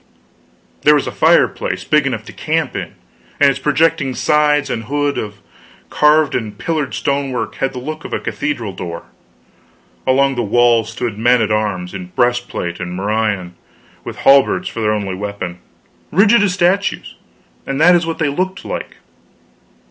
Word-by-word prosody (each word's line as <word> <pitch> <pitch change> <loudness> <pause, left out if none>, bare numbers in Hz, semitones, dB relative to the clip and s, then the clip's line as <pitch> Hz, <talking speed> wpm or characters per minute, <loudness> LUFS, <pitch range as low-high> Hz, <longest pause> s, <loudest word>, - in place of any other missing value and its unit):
There 150 0 +6
was 145 - +1
a - - -4
fireplace - - +2
big 150 -2 +2
enough 115 -4 -3
to - - -11
camp 160 -2 -2
in; 95 -4 -5 0.5
and 140 -1 +6
its 135 - -5
projecting 145 -2 +1
sides 150 -1 +2
and 115 -1 -3
hood, 145 0 -1
of 105 -1 -7 0.5
carved 150 -1 +3
and 110 -4 -3
pillared 155 -2 -2
stonework, 135 -5 -2
had 135 0 -1
the - - -7
look 155 +5 -6
of - - -8
a - - -1
cathedral 120 -9 -3
door. 85 -1 -6 1.0
Along 135 +1 +3
the 120 - -2
walls 115 0 +2
stood 115 -2 -4
men 120 +2 +4
at 110 -1 0
arms, 105 -4 -1
in 90 -2 -6
breastplate 120 -8 -1
and 90 -1 -5
morion, 100 -2 -1 0.5
with - - -7
halberds 140 0 +4
for 115 - -5
their 105 -1 +2
only 100 -3 -3
weapon 95 -2 -5 0.5
rigid 200 +6 +5
as 195 -3 +1
statues; 190 +2 0 0.5
and 135 +1 -2
that 175 +3 +6
is 170 -1 +2
what 165 - -3
they 155 -3 0
looked 185 +6 -3
like. - - -5
130 Hz, 165 wpm, -17 LUFS, 105-150 Hz, 1.0 s, There